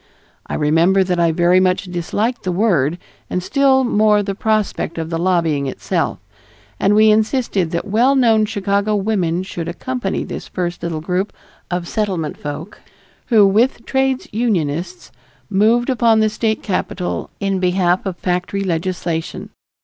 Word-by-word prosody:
I - - -3
remember 165 +6 +3
that 180 -1 -1
I 170 -1 +3
very 175 +2 +3
much 185 0 +2
disliked 200 +7 -2
the 185 - -2
word 175 -6 +1 0.3
and 180 - -2
still 270 +2 +3
more 210 -3 +3
the 195 0 -3
prospect 215 -5 -1
of 165 0 -4
the 165 - -1
lobbying 165 -6 +1
itself, - - -2 0.6
and 200 +2 +3
we 215 0 +6
insisted 215 -4 +1
that 170 +3 -3
well 235 +7 +3
known 225 -5 +4
Chicago 200 0 0
women 190 -4 0
should 175 -3 -6
accompany 200 +4 -3
this - - -7
first 175 -1 -4
little 165 -2 -3
group 180 +4 -1 0.4
of 175 -1 -3
Settlement 185 -8 -2
folk 150 +6 -7 0.5
who 220 -4 +5
with 230 +5 +2
trades 265 -1 0
unionists 180 -6 -2 0.4
moved 225 +5 +3
upon 230 -3 +3
the 215 0 +3
state 220 0 -1
capitol 180 -2 -3
in 195 -1 -1
behalf 180 0 +1
of 190 -3 -4
factory 180 +3 -2
legislation. 170 -2 -3
190 Hz, 150 wpm, -18 LUFS, 175-215 Hz, 0.6 s, we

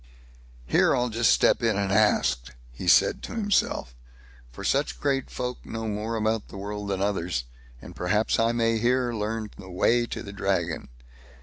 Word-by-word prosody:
"Here - - +3
I'll 125 0 0
just 115 +1 +3
step - - +4
in 115 -3 +1
and 100 -1 0
ask", 65 - +2 0.2
he - - -7
said - - +5
to - - -7
himself; 205 - 0 0.6
"for 80 - -9
such 140 +8 0
great 135 -2 0
folk 125 0 -5
know 115 0 -5
more 110 +2 -3
about 110 -1 0
the - - -10
world 105 +1 -5
than 95 -1 -1
others, 90 -9 -1 0.4
and - - -10
perhaps 105 +5 +1
I 115 0 +3
may 115 -1 +1
here 125 +1 +1
learn 110 0 -3
the 95 - -10
way 120 +6 +2
to - - -5
the 100 -2 -8
Dragon." 90 -4 -1
105 Hz, 175 wpm, -26 LUFS, 95-115 Hz, 0.6 s, said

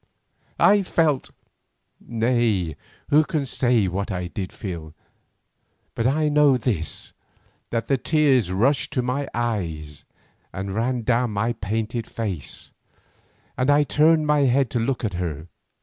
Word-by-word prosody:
I 205 0 +5
felt—nay, 120 - -2 0.3
who 150 +2 +5
can 155 -4 -2
say 120 -5 +2
what 95 +2 -3
I 90 -2 -3
did 95 0 -5
feel? 80 -5 -7 1.0
But 115 - 0
I 150 +3 +2
know 145 -3 +4
this, 105 -10 -3 0.6
that 115 -1 -2
the 135 -2 +1
tears 135 - +2
rushed 125 +9 +1
to 125 - 0
my 130 +3 -2
eyes 85 -11 -3 0.5
and 95 +1 -5
ran 120 +3 -1
down 120 +1 +1
my 110 +3 -1
painted 110 +2 -3
face, 100 -10 -5 0.8
and 130 +2 0
I 145 +1 +5
turned 155 +2 +3
my 150 0 +3
head 130 -1 +2
to 120 - 0
look 125 +1 -1
at 100 - -2
her. 80 -3 -4
120 Hz, 135 wpm, -23 LUFS, 95-135 Hz, 1.0 s, I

